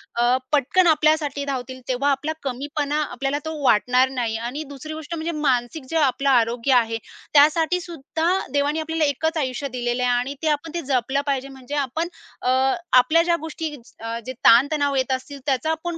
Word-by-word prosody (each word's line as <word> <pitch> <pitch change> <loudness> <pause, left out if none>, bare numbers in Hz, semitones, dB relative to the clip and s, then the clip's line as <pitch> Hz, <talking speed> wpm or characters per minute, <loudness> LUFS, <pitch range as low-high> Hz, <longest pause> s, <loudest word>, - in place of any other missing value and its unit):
अ, 240 +2 +3
पटकन 300 +6 +3
आपल्यासाठी 305 -2 +2
धावतील, 260 -2 -4
तेव्हा 260 +3 +1
आपला 275 +3 -1
कमीपणा 285 +3 -2
आपल्याला 275 +1 -2
तो 315 0 -4
वाटणार 250 +2 +4
नाही. 240 -4 -2
आणि 245 +7 -4
दुसरी 285 +2 -8
गोष्ट 315 +1 -6
म्हणजे 325 +1 -3
मानसिक 280 -1 -1
जे 325 - 0
आपलं 275 -2 +2
आरोग्य 240 +1 +2
आहे. 230 -2 +2 0.4
त्यासाठीसुद्धा 320 +1 +2 0.3
देवाने 290 +2 +1
आपल्याला 320 0 0
एकच 320 +3 -1
आयुष्य 270 -1 -2
दिलेलं 245 0 -1
आहे 245 - +2
आणि 250 +4 -1
ते 320 - -1
आपण 300 +2 -1
ते 340 - -1
जपलं 265 -1 0
पाहिजे. 275 -2 -1
म्हणजे 265 +1 -8
आपण 290 +4 -1 0.3
अ, 250 - 0 0.5
आपल्या 330 +6 +5
ज्या 345 -1 +2
गोष्टी 320 -1 -5 0.2
अ, 230 +1 -4
जे 255 - -5
ताण-तणाव 285 +4 +5
येत 260 0 0
असतील, 270 +2 -4
त्याचा 275 +2 0
आपण 330 +1 -3
280 Hz, 175 wpm, -23 LUFS, 255-315 Hz, 0.5 s, आपल्या